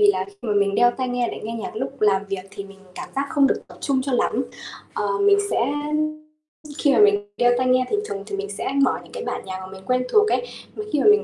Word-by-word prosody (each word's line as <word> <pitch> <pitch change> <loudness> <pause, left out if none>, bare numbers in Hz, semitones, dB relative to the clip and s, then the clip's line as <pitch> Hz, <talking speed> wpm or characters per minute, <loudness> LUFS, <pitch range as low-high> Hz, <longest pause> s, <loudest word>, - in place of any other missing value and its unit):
vì 415 - +7
là - - -1
khi 400 - -16
mà 215 - -1
mình 200 -1 +2
đeo 240 +3 +5
tai 255 +1 -3
nghe 245 -1 0
để - - -7
nghe 225 - -4
nhạc 225 - -6
lúc 265 +4 -4
làm 200 -2 +3
việc 195 -1 -3
thì 200 0 -7
mình 195 0 -14 0.2
cảm - - -7
giác 275 +1 0
không 280 -2 +4
được - - 0
tập - - -14
trung 270 -2 +1
cho 270 0 -3
lắm. 245 - +1 0.5
Ờ, - - -2 0.2
mình 405 0 +5
sẽ - - +1 1.2
khi 285 - +3
mà - - +3
mình 410 -1 +4
đeo 245 0 +4
tai 255 0 +1
nghe 255 0 +4
thì 420 - +1
thường 195 - -5
thì 205 -2 -4
mình 200 0 -4
sẽ 205 +6 -3
mở 265 - +2
những - - -17
cái 480 -2 -5
bản - - -3
nhạc 185 -1 -5
mà 185 - -8
mình 190 0 -11
quen 255 +2 +1
thuộc 430 0 +5
ấy. - - +1 0.3
Mà 425 - -4
khi 295 - +3
mà - - 0
mình 420 0 +5
250 Hz, 280 wpm, -23 LUFS, 200-290 Hz, 1.2 s, vì